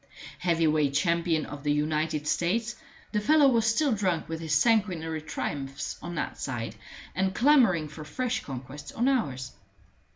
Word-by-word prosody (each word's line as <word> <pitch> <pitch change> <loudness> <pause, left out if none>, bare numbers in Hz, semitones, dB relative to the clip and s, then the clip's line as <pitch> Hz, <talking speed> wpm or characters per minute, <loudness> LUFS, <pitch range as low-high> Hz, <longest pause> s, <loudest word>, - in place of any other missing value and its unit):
Heavy 170 -2 +2
weight 150 -3 +2
champion 165 +1 +1
of 145 -1 -8
the 145 0 0
United 150 +1 0
States, 220 +10 0 0.4
the 210 - +1
fellow 295 +6 +5
was 230 -4 +3
still 270 +5 +2
drunk 185 -7 0
with 160 0 -4
his 160 -2 -1
sanguinary 170 -6 +2
triumphs 140 -2 -4
on 175 +1 -6
that 155 - -3
side, 120 -4 -4 0.4
and 190 0 0
clamoring 240 - +4
for 155 +1 -9
fresh 245 +11 -2
conquests 135 +2 -8
on 240 +3 +1
ours. 140 - 0
165 Hz, 155 wpm, -28 LUFS, 150-220 Hz, 0.4 s, fellow